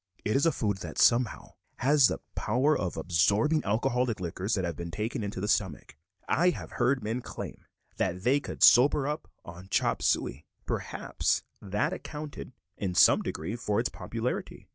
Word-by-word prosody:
It 105 - +1
is 140 +4 +3
a - - +4
food 105 -8 -1
that, - - -8
somehow, 120 -1 +2 0.2
has 140 0 +4
the - - -4
power 130 +8 +1
of 90 - -3
absorbing 100 - +2
alcoholic 120 +2 0
liquors 90 +4 -2
that 95 -3 -1
have 85 -2 -3
been 85 +1 -6
taken 110 +7 -3
into 100 -2 -4
the 105 - -2
stomach. 95 -8 -1 0.3
I 175 +2 +3
have 180 - -5
heard 130 0 +1
men 115 +4 -2
claim - - -8 0.3
that 90 0 -1
they 135 +5 +3
could - - -4
sober 135 +3 +6
up 150 +1 -4 0.2
on 85 +2 -10
chop - - +1
suey. 60 +5 0 0.2
Perhaps - - -1 0.2
that 105 - -1
accounted, 150 -6 -7 0.3
in 95 -3 -3
some - - +6
degree, 85 +9 -4
for 105 -3 -1
its 120 - 0
popularity. 115 +2 -5
110 Hz, 170 wpm, -29 LUFS, 95-135 Hz, 0.3 s, sober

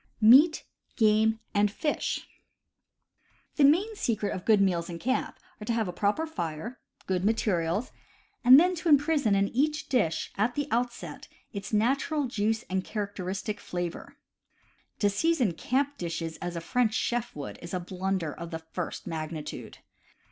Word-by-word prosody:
MEAT, 270 +9 +7 0.3
GAME, 220 0 +3
AND 205 0 +3
FISH 295 +8 -2 1.3
The 295 - +4
main 370 +11 +4
secrets 215 - -1
of 185 - -7
good 215 -2 +5
meals 180 -3 +1
in 170 - -5
camp 260 - -1 0.2
are - - -5
to 235 - 0
have 225 -3 0
a 180 - -4
proper 205 - 0
fire, 220 - -5 0.3
good 185 -1 -1
materials, 200 -1 0 0.5
and 255 +3 +10
then 360 +3 +3
to 335 +1 -1
imprison 290 -7 +4
in 195 0 +2
each 300 +4 0
dish, 205 - 0
at 230 +4 +1
the 290 -1 -1
outset, 240 +1 -3 0.3
its 200 -1 -6
natural 275 +7 +1
juice 225 -1 -1
and 190 0 -1
char 210 0 -3
acteristic 195 +3 -4
flavor. 175 -1 -5 0.8
To 205 - +2
season 245 - +1
camp 275 - -1
dishes 165 -1 -4
as 175 0 -5
a 170 - -3
French 220 +5 +1
chef 240 -1 -1
would 145 -2 -7
is 170 - -8
a 185 - -1
blunder 185 -2 -2
of 170 0 -7
the 165 - -4 0.2
first 180 -2 -4
magnitude. 155 -1 -6
215 Hz, 155 wpm, -28 LUFS, 180-260 Hz, 1.3 s, and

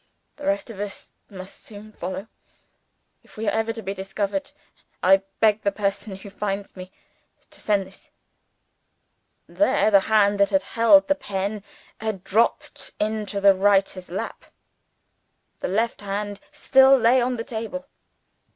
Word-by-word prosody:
The 290 -1 -6
rest 295 -4 -1
of 200 - -11
us 205 -1 -6 0.2
must 190 -1 -11
soon 215 0 -11
follow. 190 +1 -6 0.9
If - - -21
we 220 0 -4
are - - +3
ever 225 +1 0
discovered, 205 +5 -4 0.5
I 190 +1 +6 0.2
beg 220 -1 +3
the 200 - +1
person 200 0 -3
who 195 +1 -11
finds 200 0 -4
me 185 0 -10 0.6
to - - -14
send 205 -2 +1
this 190 +1 -17 0.7
' - - -48
"There 215 -8 +3
the 200 - +7
hand 205 -2 +3
that 200 - +4
held 290 +6 +4
the 290 - +4
pen 205 -5 -4 0.4
had 215 -4 -4
dropped 225 +4 -1
into 210 -1 -2
the 200 0 +6
writer's 195 -1 +1
lap. 180 - -5 1.1
The - - -3
left 225 +5 -1
hand 205 0 -4
still 265 0 +5
lay 245 +1 +4
on 250 +1 0
the 230 - -4
table. 240 +3 -5
205 Hz, 140 wpm, -23 LUFS, 195-225 Hz, 1.1 s, the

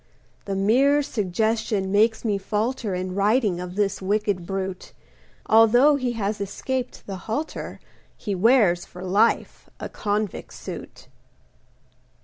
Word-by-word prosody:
The 195 - -3
mere 265 +9 +3
suggestion 215 -3 -1
makes 220 +3 +2
me 205 -3 0
falter 210 +1 -2
In 185 0 -3
writing 205 -1 +2
of 180 0 -6
this 205 -1 0
wicked 200 -2 -1
brute; 190 -1 -4 0.5
Although 240 +6 +5
he 255 -3 -1
has 210 -2 -2
escaped 250 +6 -4
the 195 -1 -6
halter, 295 +9 -4 0.4
He 205 - -4
wears 195 -3 +4
for 180 - -11
life 200 +5 +1
a - - -5
convict's 210 -2 -3
suit. - - -9
210 Hz, 125 wpm, -24 LUFS, 195-230 Hz, 0.5 s, Although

